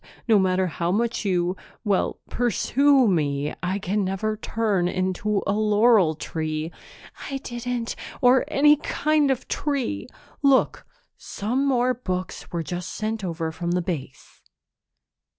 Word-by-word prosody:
No 220 Hz, -3 st, +5 dB
matter 185 Hz, 0 st, +2 dB
how 170 Hz, 0 st, -2 dB
much 230 Hz, +2 st, 0 dB
you 180 Hz, -1 st, +1 dB, 0.3 s
well, 205 Hz, -4 st, 0 dB
pursue 260 Hz, +3 st, +3 dB
me, 150 Hz, -5 st, 0 dB
I 185 Hz, +2 st, -1 dB
can 200 Hz, +1 st, -1 dB
never 195 Hz, +3 st, -1 dB
turn 210 Hz, -4 st, 0 dB
into 185 Hz, +3 st, -1 dB
a 200 Hz, -, +1 dB
laurel 210 Hz, -4 st, +4 dB
tree." 155 Hz, +1 st, -3 dB, 0.6 s
"I 275 Hz, -, -2 dB
didn't 240 Hz, -2 st, -4 dB
" -, -, -13 dB
"Or 250 Hz, +1 st, +5 dB
any 295 Hz, +2 st, +5 dB
kind 300 Hz, 0 st, +1 dB
of 265 Hz, -2 st, -1 dB
tree! 265 Hz, -, -2 dB, 0.3 s
Look, 275 Hz, -2 st, +2 dB, 0.3 s
some 250 Hz, +7 st, -2 dB
more 255 Hz, -1 st, +2 dB
books 185 Hz, -7 st, -5 dB
were 170 Hz, -1 st, -2 dB
just 175 Hz, +2 st, -5 dB
sent 220 Hz, -1 st, -3 dB
over 165 Hz, -2 st, -3 dB
from 170 Hz, +2 st, -4 dB
Base." 170 Hz, -7 st, -4 dB
205 Hz, 135 wpm, -24 LUFS, 175-245 Hz, 0.6 s, No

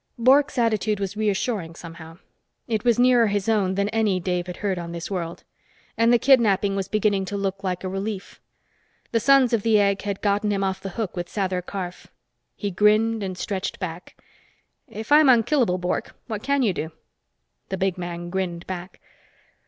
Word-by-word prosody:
Bork's 275 Hz, +4 st, +4 dB
attitude 215 Hz, -3 st, +1 dB
was 195 Hz, 0 st, -3 dB
reassuring, 205 Hz, -4 st, -1 dB
somehow. 165 Hz, -1 st, -11 dB, 0.5 s
It 220 Hz, -3 st, -1 dB
was 240 Hz, -2 st, +3 dB
nearer 245 Hz, -2 st, +5 dB
his 205 Hz, -1 st, -1 dB
own 200 Hz, -4 st, +2 dB
than 200 Hz, +1 st, +1 dB
any 215 Hz, -4 st, +1 dB
Dave 180 Hz, 0 st, -2 dB
had 180 Hz, -, -6 dB
heard 190 Hz, -3 st, 0 dB
on 170 Hz, 0 st, -6 dB
this 170 Hz, +3 st, -6 dB
world. 170 Hz, -3 st, -4 dB, 0.5 s
And 230 Hz, +1 st, +3 dB
the 240 Hz, -, +6 dB
kidnapping 210 Hz, -6 st, +3 dB
was 195 Hz, -1 st, -2 dB
beginning 205 Hz, -2 st, +1 dB
to 200 Hz, +2 st, -4 dB
look 195 Hz, 0 st, -3 dB
like 185 Hz, -1 st, -2 dB
a -, -, -2 dB
relief. 195 Hz, +1 st, -5 dB, 0.7 s
The 230 Hz, -, +2 dB
Sons 260 Hz, 0 st, +4 dB
of 230 Hz, -, +2 dB
the 220 Hz, 0 st, +3 dB
Egg 200 Hz, -1 st, +2 dB
had 200 Hz, -1 st, -4 dB
gotten 205 Hz, +1 st, +1 dB
him 200 Hz, -1 st, 0 dB
off 190 Hz, -1 st, -2 dB
the 195 Hz, -, -5 dB
hook 220 Hz, -5 st, -3 dB
with 175 Hz, -1 st, -4 dB
Sather 185 Hz, -3 st, -2 dB
Karf. 180 Hz, -1 st, -6 dB, 0.5 s
He 205 Hz, -2 st, -3 dB
grinned 215 Hz, +3 st, +3 dB
and 185 Hz, -2 st, -4 dB
stretched 195 Hz, 0 st, -3 dB
back. 180 Hz, -2 st, -7 dB, 0.7 s
"If 220 Hz, +5 st, -8 dB
I'm 300 Hz, -1 st, +7 dB
unkillable, 235 Hz, -5 st, +3 dB
Bork, 180 Hz, 0 st, -3 dB
what 215 Hz, -2 st, -5 dB
can 280 Hz, +1 st, +1 dB
you 205 Hz, -5 st, +2 dB
do?" 160 Hz, -1 st, -4 dB, 0.8 s
The 190 Hz, -, -2 dB
big 190 Hz, -1 st, 0 dB
man 175 Hz, 0 st, -5 dB
grinned 180 Hz, -2 st, -3 dB
back. 185 Hz, 0 st, -7 dB
200 Hz, 185 wpm, -24 LUFS, 185-225 Hz, 0.8 s, I'm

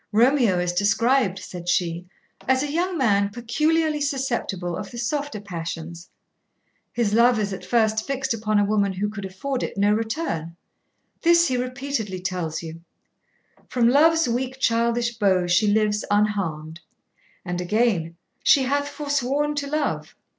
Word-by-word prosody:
'Romeo 235 Hz, -3 st, +3 dB
is 175 Hz, 0 st, -1 dB
described,' 215 Hz, +2 st, +2 dB
said 175 Hz, -2 st, -7 dB
she, 175 Hz, 0 st, 0 dB, 0.4 s
'as 260 Hz, +1 st, +3 dB
a 290 Hz, -, -3 dB
young 350 Hz, +3 st, -1 dB
man 200 Hz, -7 st, +2 dB
peculiarly 300 Hz, +7 st, 0 dB
susceptible 240 Hz, -, -2 dB
of 200 Hz, +1 st, -6 dB
the 240 Hz, -, -10 dB
softer 280 Hz, 0 st, -2 dB
passions; 170 Hz, -3 st, -7 dB, 0.8 s
his 225 Hz, -4 st, 0 dB
love 235 Hz, +1 st, +5 dB
is 205 Hz, -2 st, -1 dB
at 190 Hz, -, -7 dB
first 220 Hz, -2 st, +1 dB
fixed 265 Hz, -2 st, -1 dB
upon 215 Hz, -1 st, 0 dB
a 205 Hz, -, +3 dB
woman 200 Hz, -1 st, +1 dB
who 195 Hz, +3 st, -2 dB
could 200 Hz, -2 st, -6 dB
afford 250 Hz, +8 st, -4 dB
it -, -, -4 dB
no 205 Hz, +1 st, +3 dB
return; 215 Hz, -, -3 dB, 0.6 s
this 340 Hz, 0 st, +4 dB
he 255 Hz, -, 0 dB
repeatedly 250 Hz, -6 st, -3 dB
tells 180 Hz, -3 st, -3 dB
you, 165 Hz, 0 st, -8 dB, 0.9 s
From 240 Hz, -2 st, +2 dB
love's 320 Hz, +4 st, +4 dB
weak, 255 Hz, +2 st, -2 dB
childish 235 Hz, -1 st, +1 dB
bow 190 Hz, -4 st, +3 dB
she 175 Hz, +5 st, +3 dB
lives 210 Hz, 0 st, +2 dB
unharmed, 185 Hz, -7 st, -1 dB, 0.7 s
and 180 Hz, 0 st, -3 dB
again 180 Hz, -4 st, 0 dB, 0.3 s
She 275 Hz, -, +5 dB
hath 285 Hz, +2 st, 0 dB
forsworn 290 Hz, 0 st, -1 dB
to 290 Hz, -1 st, -3 dB
love. 300 Hz, 0 st, -2 dB
220 Hz, 145 wpm, -23 LUFS, 190-265 Hz, 0.9 s, love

